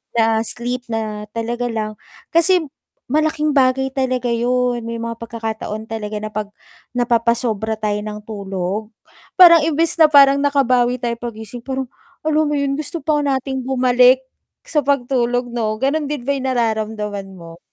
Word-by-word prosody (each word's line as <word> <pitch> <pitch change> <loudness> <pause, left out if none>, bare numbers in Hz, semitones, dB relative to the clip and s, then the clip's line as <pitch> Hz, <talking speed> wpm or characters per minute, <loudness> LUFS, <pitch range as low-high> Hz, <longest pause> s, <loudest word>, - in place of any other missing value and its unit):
na 225 -1 +3
sleep 245 +1 -4
na 215 -2 -4
talaga 240 +2 -2
lang. 215 -2 -4 0.3
Kasi 345 +1 +4 0.5
malaking 305 0 +1
bagay 265 -1 +2
talaga 255 -2 -1
yun, 245 0 0
may 230 - -4
mga 230 0 -5
pagkakataon 220 -2 -5
talaga 215 -1 -5
na 215 - -5
napag 215 0 -3 0.5
napapasobra 235 -2 +1
tayo 210 -1 -2
ng 210 0 -7
tulog, 200 -1 -4 0.5
parang 340 -3 +9
imbes 330 +2 0
na 315 - +8
parang 280 -2 +6
nakabawi 255 -4 +2
tayo 235 -2 -3
paggising 230 0 -7
parang 265 -1 -4 0.3
alam 310 0 +2
mo 295 - 0
yun 280 0 -1
gusto 320 +1 -5
pa 300 0 +1
nating 265 -2 -2
bumalik 255 0 +4 0.4
sa 305 - 0
pagtulog 245 -3 0
'no 220 -2 -1
ganon 290 +2 0
din 290 -4 -4
ba 280 - 0
yung 265 -1 -3
nararamdaman 215 -4 -2
mo? 170 -1 -12
245 Hz, 150 wpm, -19 LUFS, 220-275 Hz, 0.5 s, parang